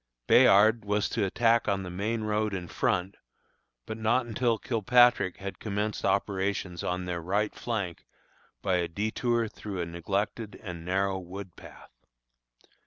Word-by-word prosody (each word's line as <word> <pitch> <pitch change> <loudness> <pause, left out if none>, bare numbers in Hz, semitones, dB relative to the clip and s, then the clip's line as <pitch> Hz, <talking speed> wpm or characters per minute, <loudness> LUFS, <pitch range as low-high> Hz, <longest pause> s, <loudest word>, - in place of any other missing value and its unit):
Bayard 110 - +6
was 105 0 0
to 110 - -1
attack 115 +3 +2
on 100 -2 0
the 90 - -6
main 110 +5 -2
road 105 -1 0
in 90 -2 -5
front, 90 +3 -1 0.7
but 110 - -6
not 115 +3 +2
until 120 0 0
Kilpatrick 120 -3 +3
had 100 0 -7
commenced 105 0 -2
operations 95 -3 -1
on 90 0 -2
their 90 -1 -3
right 100 +5 0
flank 100 -8 -4 0.6
by 95 -2 +2
a 85 -1 0
detour 115 +5 -1
through 105 -2 -7
a 85 - -1
neglected 100 +6 -3
and 85 -4 -7
narrow 95 +2 0
wood 95 0 -9
path. - - -14
100 Hz, 145 wpm, -28 LUFS, 95-110 Hz, 0.7 s, Bayard